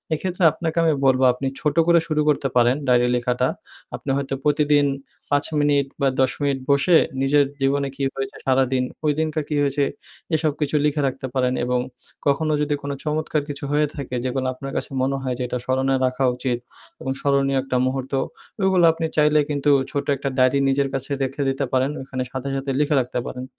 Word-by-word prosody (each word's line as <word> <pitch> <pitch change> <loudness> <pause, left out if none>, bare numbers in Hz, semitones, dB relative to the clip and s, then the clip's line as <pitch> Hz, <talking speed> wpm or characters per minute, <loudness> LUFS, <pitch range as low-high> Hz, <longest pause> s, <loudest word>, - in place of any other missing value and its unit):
এক্ষেত্রে 180 +2 -2
আপনাকে 165 -1 -4
আমি 160 - +4
বলব 130 0 +4
আপনি 130 +2 -5
ছোট 150 +1 0
করে 170 0 +6
শুরু 155 -1 +1
করতে 140 -2 +1
পারেন 120 +2 +4
ডায়রি 125 -1 +4
লেখাটা। 125 +1 0 0.5
আপনি 135 - -5
হয়তো 140 -1 -2
প্রতিদিন 150 -1 +3 0.4
৫ 145 0 +2
মিনিট 145 -1 +2
বা 140 - +3
১০ 130 - +3
মিনিট 140 -2 0
বসে 150 +5 +5 0.3
নিজের 145 +1 +4 0.2
জীবনে 140 +1 +1
কী 140 - -4
হয়েছে? 135 0 -5
সারাদিন 130 -1 +2 0.2
ঐদিনকার 155 +1 0
কী 150 - -2
হয়েছে? 140 0 +1 0.5
এসব 155 -1 +1
কিছু 150 +1 0
লিখে 150 0 +1
রাখতে 135 0 -3
পারেন 125 -1 +1
এবং 125 0 0 0.5
কখনো 155 +2 +2
যদি 150 0 0
কোন 140 - -4
চমৎকার 155 0 -1
কিছু 145 0 -5
হয়ে 150 0 +3
থাকে 140 -4 -6
যেগুলা 130 0 -1
আপনার 135 +1 -7
কাছে - - -2
মনে 135 +1 0
হয় 130 -1 -2
যে 125 - -2
এটা 125 - -2
স্মরণে 130 +1 +1
রাখা 130 +1 -1
উচিত 125 -1 -2 0.4
এবং 130 - -3
স্মরণীয় 140 -1 +2
একটা 130 -1 -2
মুহূর্ত 130 +1 -3 0.5
ওইগুলা 190 -3 +4
আপনি 165 0 -2
চাইলে 150 0 +4
কিন্তু 145 0 +1 0.2
ছোট্ট 140 0 -3
একটা 140 +1 -3
ডায়রি 130 +2 +4
নিজের 135 0 +1
কাছে 135 +1 -3
রেখে 135 +2 -2
দিতে 135 +1 -1
পারেন 130 +2 +2
ওখানে 130 -1 -4
সাথে, 130 +1 -4
সাথে 135 0 -3
লিখে 150 +1 +2
রাখতে 125 0 -3
পারেন। 125 0 -6
140 Hz, 190 wpm, -22 LUFS, 130-150 Hz, 0.5 s, করে